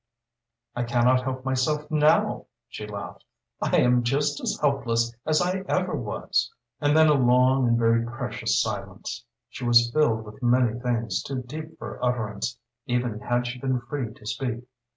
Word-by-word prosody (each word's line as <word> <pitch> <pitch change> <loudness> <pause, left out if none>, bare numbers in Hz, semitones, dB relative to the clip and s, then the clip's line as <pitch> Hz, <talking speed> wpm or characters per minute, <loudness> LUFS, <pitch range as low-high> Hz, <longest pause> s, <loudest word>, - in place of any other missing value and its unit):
"I 120 - -1
can 120 0 +1
not 125 0 +4
help 130 0 -4
myself 150 +3 0
now," 150 0 +3 0.2
she 105 - -7
laughed. 100 -1 -7 0.4
"I - - +2
am 125 0 +4
just 145 +4 0
as - - -1
helpless 115 -5 +1
as 155 +2 +3
I 185 +2 0
ever - - 0
was." - - -1 0.3
And 145 0 +3
then 160 0 +7
a 150 - +5
long 125 0 +4
and 115 0 +3
very 115 0 +3
precious 120 - -2
silence. - - -4 0.2
She 125 - -9
was 120 0 +5
filled 115 -6 +2
with 105 +5 -12
many 120 -1 +2
things 115 -5 -1
too 130 -2 -4
deep 155 +5 -8
for - - -8
utterance, 115 -2 -1 0.3
even 120 -3 -1
had 120 +1 0
she 120 +1 -5
been 130 -1 0
free 120 -1 -4
to 110 - -17
speak. 125 0 -3
125 Hz, 170 wpm, -25 LUFS, 120-135 Hz, 0.4 s, then